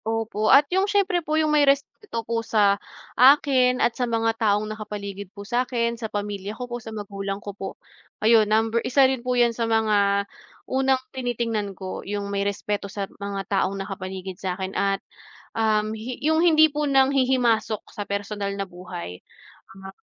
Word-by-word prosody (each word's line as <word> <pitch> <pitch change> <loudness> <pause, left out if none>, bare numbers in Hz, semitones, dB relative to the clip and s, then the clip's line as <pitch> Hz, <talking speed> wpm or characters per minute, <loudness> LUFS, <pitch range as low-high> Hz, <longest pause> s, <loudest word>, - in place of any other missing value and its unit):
Opo 225 -1 -1
at 280 +2 +7
yung 380 +2 +2
siyempre 390 -4 +2
po 310 -1 -1
yung 310 -1 +2
may 300 - +5
respeto 275 - 0
po 230 0 -1
sa 205 -3 +2 0.3
akin 255 -1 +5
at 240 - +2
sa 245 0 -2
mga 225 0 +1
taong 210 -1 +2
nakapaligid 200 -2 -7
po 200 +1 -11
sa'kin, 240 0 0
sa 230 -2 -6
pamilya 205 0 -4
ko 250 - -4
po, 240 0 -6
sa 225 - -9
magulang 200 -2 -5
ko 205 0 -8
po. 195 0 -6 0.6
Ayun, 220 -2 +5
number 225 +2 +2
isa 270 +1 +4
rin 260 -2 +1
po 250 0 -1
yan 240 -1 +4
sa 230 0 -2
mga 205 -3 +2 0.4
unang 265 0 +2 0.2
tinitingnan 230 -6 -2
ko. 190 -1 -6
Yung 200 0 -4
may 200 - 0
respeto 200 0 -2
sa 200 0 -4 0.2
mga 200 -1 -4
taong 195 -1 0
nakapaligid 190 -1 -6
sa'kin 190 0 -3
at, 195 0 0 0.5
um, 215 -1 +1
hi 230 +3 -6
yung 315 +1 +3
hindi 315 -2 +6
po 295 -1 -1
nanghihimasok 255 -5 +2
sa - - -6
personal 200 0 -3
na 195 - -2
buhay, 175 - -8 0.6
ah 195 0 -9
220 Hz, 170 wpm, -24 LUFS, 200-250 Hz, 0.6 s, at